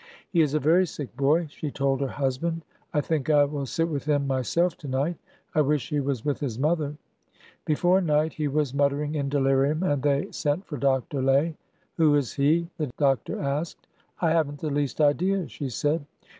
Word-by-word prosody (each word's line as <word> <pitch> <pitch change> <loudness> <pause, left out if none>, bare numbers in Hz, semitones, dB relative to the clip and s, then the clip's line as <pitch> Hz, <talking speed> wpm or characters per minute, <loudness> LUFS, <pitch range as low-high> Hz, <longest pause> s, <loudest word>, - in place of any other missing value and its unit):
" - - -28
He 170 - +5
is 150 -1 +1
a - - +3
very 170 +6 +4
sick 145 -6 -7
boy," 145 +5 +2
she 150 - -5
told 135 -1 0
her 135 - +1
husband. 145 +5 -2
" - - -39
I 150 - +1
think 150 -1 -2
I 145 -1 +6
will 140 -1 -4
sit 165 +5 0
with 145 -4 -3
him 145 -2 +1
myself 140 +6 +1
to 145 - -9
night. 140 +6 -1 0.4
I 155 - +3
wish 145 -3 0
he 150 - 0
was 135 -3 -2
with 145 -2 0
his 125 -7 -3
mother! 150 +1 0 0.4
" - - -28
Before 175 +5 +3
night 155 -2 +1
he 150 -2 -2
was 145 -2 0
muttering 140 +1 +1
in 140 -2 -1
delirium, 140 +3 +2
and 145 -7 +1
they 140 0 +1
sent 150 +6 -1
for 150 - -6
Dr. 135 +1 0
Lay. 140 +5 +2 0.2
" - - -41
Who 155 -3 +4
is 140 -5 0
he.? 160 +5 +2
" - - -46
the 150 - 0
doctor 135 -5 +1
asked. 145 +4 -3 0.2
" - - -39
I 165 -2 +3
have 160 -3 +2
n't 145 - -9
the 150 +1 -3
least 145 -2 -1
idea," 175 +5 +2
she 140 - -5
said. 145 +5 0
145 Hz, 220 wpm, -26 LUFS, 140-155 Hz, 0.4 s, I